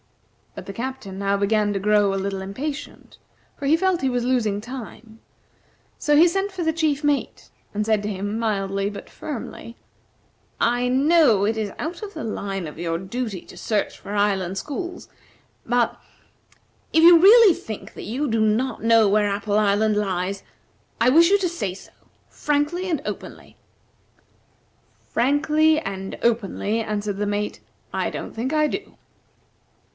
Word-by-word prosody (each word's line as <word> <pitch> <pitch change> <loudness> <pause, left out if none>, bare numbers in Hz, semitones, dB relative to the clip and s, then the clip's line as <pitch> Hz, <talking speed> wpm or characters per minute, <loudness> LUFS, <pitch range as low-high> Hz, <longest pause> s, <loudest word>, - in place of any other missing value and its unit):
But - - -8
the 195 - -7
Captain 235 -5 -6
now 200 0 +1
began 205 +1 +1
to 195 - -1
grow 205 0 +3
a - - -1
little 195 0 -3
impatient, 275 +10 -6 0.4
for 280 - -4
he 315 +3 +4
felt 375 -1 +1
he 265 - +1
was 245 -1 -1
losing 225 -6 +1
time; 225 -1 -9 0.8
so 295 -1 +2
he 335 +3 +7
sent 390 +3 -1
for 375 -2 -4
the 320 0 +1
chief 310 -2 0
mate, 290 -1 -1 0.2
and 210 +1 -1
said 215 -1 +2
to 210 - -2
him 205 +2 -3
mildly 200 -3 -1
but 205 - -9
firmly: 240 -4 -7 0.8
"I 245 +1 +2
know 265 - +4
it 220 +2 +1
is 215 -2 -3
out 335 +3 -5
of 415 -1 -8
the - - -5
line 195 -5 -4
of 150 - -10
your 165 -1 -1
duty 200 +1 -4
to - - -15
search 215 -3 -2
for 200 - -8
island 195 -2 0
schools, 350 - -5 0.6
but, 240 0 +1 0.9
if 320 - +4
you 340 0 +9
really 415 +1 +8
think 215 -7 -8
that - - -9
you 265 +7 -2
do 225 -2 0
not 220 +2 0
know 225 -1 +5
where 205 +1 +2
Apple 205 +1 -1
Island 210 +1 +2
lies, 195 -1 -2 0.6
I 235 - +4
wish 335 +4 +6
you 405 - +5
to 385 -2 0
say 205 - -4
so, - - -14 0.4
frankly 300 +5 -1
and 315 -5 -1
openly." - - -7 1.5
"Frankly 305 +4 +3
and 195 -7 -6
openly," 225 -1 0
answered 210 -2 -3
the 205 0 -1
mate, 205 0 -2 0.3
"I - - -1
don't - - -6
think 240 +5 -3
I 305 -1 +3
do." 390 +6 -6
225 Hz, 160 wpm, -23 LUFS, 205-295 Hz, 1.5 s, you